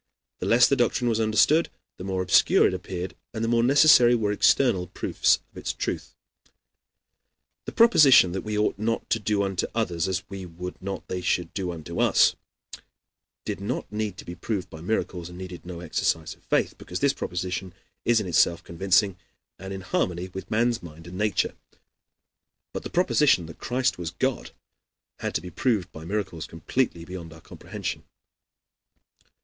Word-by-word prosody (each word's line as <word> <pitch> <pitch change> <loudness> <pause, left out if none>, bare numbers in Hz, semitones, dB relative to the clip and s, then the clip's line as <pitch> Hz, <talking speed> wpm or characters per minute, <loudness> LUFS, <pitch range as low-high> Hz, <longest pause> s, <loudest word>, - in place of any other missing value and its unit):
The - - -3
less 120 +2 +6
the 140 - +2
doctrine 120 -1 +1
was 115 -1 0
understood, 110 +9 +3 0.3
the - - -8
more 95 -1 -2
obscure 90 - +5
it - - +2
appeared 90 0 -5 0.2
and 110 - -2
the - - 0
more 115 0 +3
necessary 125 -2 +6
were 105 -3 0
external 105 -3 +3
proofs 90 - +1
of - - -17
its - - -3
truth. - - -4 1.5
The - - -5
proposition 150 - +6
that 95 +1 -3
we 105 -1 -3
ought 105 -1 0
not 115 +2 -1
to 115 - +2
do 105 -1 0
unto 95 -2 -1
others 90 -7 0
as 95 0 -2
we 95 -1 -7
would 90 +1 -8
not 95 +1 -5
they 90 - -3
should 90 -1 -1
do 95 -3 -2
unto 85 0 -6
us, - - +4 1.1
did - - -4
not 100 - -4
need 105 -3 -3
to - - -10
be 85 - -6
proved 90 +2 -4
by 80 - -9
miracles 90 -3 -2
and 90 - -11
needed 90 -1 -8
no 85 -2 -7
exercise 80 -1 -1
of - - -23
faith, - - 0
because 90 - -5
this 140 -1 +3
proposition 90 -1 -4 0.3
is 120 -1 +3
in 105 - -3
itself 85 -1 +2
convincing 95 +2 +1 0.4
and 95 +1 -7
in 95 0 -5
harmony 90 0 -2
with 95 +1 -8
man's 120 +1 +1
mind 80 -1 -12
and 90 +1 -9
nature; 105 -2 +1 1.2
but - - -4
the - - -7
proposition 150 - +3
that 80 - -11
Christ 125 -3 0
was 85 -2 -3
God - - -2 0.7
had - - -4
to - - 0
be 90 +1 -9
proved 110 -9 0
by 80 0 -10
miracles 95 -4 -3
completely 85 +1 -2
beyond 90 -3 -8
our 80 +1 -13
comprehension. - - -6
95 Hz, 175 wpm, -25 LUFS, 90-110 Hz, 1.5 s, less